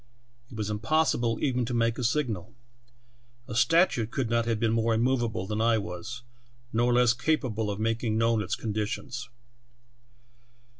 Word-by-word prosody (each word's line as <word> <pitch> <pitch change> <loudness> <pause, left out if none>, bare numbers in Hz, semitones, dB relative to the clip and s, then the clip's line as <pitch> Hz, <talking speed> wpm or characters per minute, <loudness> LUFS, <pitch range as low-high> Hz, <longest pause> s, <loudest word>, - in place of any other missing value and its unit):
It 115 - -10
was 105 -1 -2
impossible 120 0 +1
even 125 -3 +1
to 120 +1 -3
make 115 0 +1
a - - -2
signal. 115 - -1 0.9
A 125 - -6
statue 145 - +3
could 120 0 -3
not 115 -1 +2
have 115 -2 0
been 115 -1 +1
more 115 0 +2
immovable 120 -4 0
than 105 +2 -2
I 115 0 +3
was, 110 +5 -6 0.5
nor 120 +2 +2
less 120 -1 +4
capable 120 -5 -1
of 100 0 -3
making 115 0 0
known 115 -1 +2
its - - -2
conditions. 120 +3 -4
115 Hz, 150 wpm, -28 LUFS, 110-125 Hz, 0.9 s, less